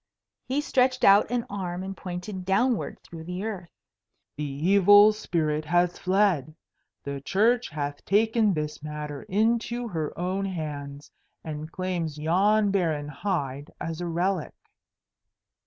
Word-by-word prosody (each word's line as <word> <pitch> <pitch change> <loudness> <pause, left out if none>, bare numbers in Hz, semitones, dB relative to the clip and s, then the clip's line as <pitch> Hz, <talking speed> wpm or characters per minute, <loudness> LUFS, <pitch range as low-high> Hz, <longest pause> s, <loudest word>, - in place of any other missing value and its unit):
He 270 +3 0
stretched 255 -3 +1
out 200 +1 +6
an 240 -1 -1
arm 185 -2 -4
and 195 0 -5
pointed 185 +1 -6
downward 210 +5 +1
through 165 -1 -10
the 180 +3 -4
earth. 195 -6 -5 0.7
"The 150 - -4
evil 200 +8 +5
spirit 155 -7 -1
has 175 +2 +1
fled. 185 -7 +1 0.5
The 140 -1 -5
Church 230 - +2
hath 145 -1 -4
taken 220 +1 +3
this 150 0 -4
matter 150 -2 -6
into 235 +4 +1
her 160 -5 -3
own 185 +3 -1
hands, 145 -5 -6 0.3
and 155 0 -6
claims 175 -5 -3
yon 200 +7 +2
barren 160 -7 0
hide 145 -4 -3
as 165 +1 -4
a 175 - -2
relic." 175 -1 -1
180 Hz, 130 wpm, -26 LUFS, 155-205 Hz, 0.7 s, out